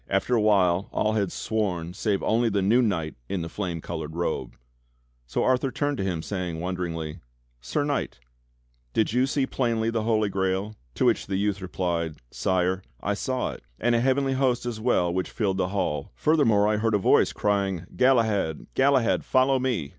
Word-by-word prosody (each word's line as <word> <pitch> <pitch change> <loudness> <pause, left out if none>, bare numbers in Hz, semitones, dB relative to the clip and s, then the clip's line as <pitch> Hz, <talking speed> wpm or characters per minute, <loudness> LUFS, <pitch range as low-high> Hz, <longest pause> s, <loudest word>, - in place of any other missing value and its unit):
After 95 +5 +1
a 115 - +4
while 95 -3 +3
all 110 - +1
had 100 -4 0
sworn 90 -6 -2
save 100 +1 -1
only 115 +1 +2
the 100 -2 0
new 115 +6 +4
knight 85 -9 0 0.2
in 95 -4 -2
the - - -4
flame 90 -5 -4
cclored 80 -2 -5
robe. 85 0 -2 0.7
So 60 - -1
Arthur 130 +1 +2
turned 145 +1 -1
to 95 - -2
him 90 -4 -2
saying 90 -4 -3
wonderingly: 85 -3 -4 0.4
"Sir 60 - -1
Knight, 145 -1 -2 0.8
did 110 0 +1
you 125 +2 +3
see 135 0 +1
plainly 115 -4 0
the 115 -1 0
Holy 110 -1 +1
Grail.'^" 95 +1 -1 0.2
To - - +1
which - - +2
the 95 - -1
youth 100 0 0
replied: 85 -3 -2 0.2
"Sire, 95 0 0 0.2
I 100 - -1
saw 130 +5 -2
it, - - -10 0.2
and 120 +1 +2
a 115 - +3
heavenly 135 +1 +2
host 130 -2 +1
as 120 -3 -3
well 100 -7 +1
which 95 0 -1
filled 100 -5 -1
the 95 - +1
hall. 75 -7 -2
Furthermore 115 - +3
I 105 0 +2
heard 110 0 +1
a - - +5
voice 95 - +4
crying: 100 -4 0
'Galahad, 110 - +2
Galahad, 130 -3 +3
fol 130 0 +3
low 135 -1 +3
me! 120 - -1
100 Hz, 185 wpm, -26 LUFS, 90-120 Hz, 0.8 s, a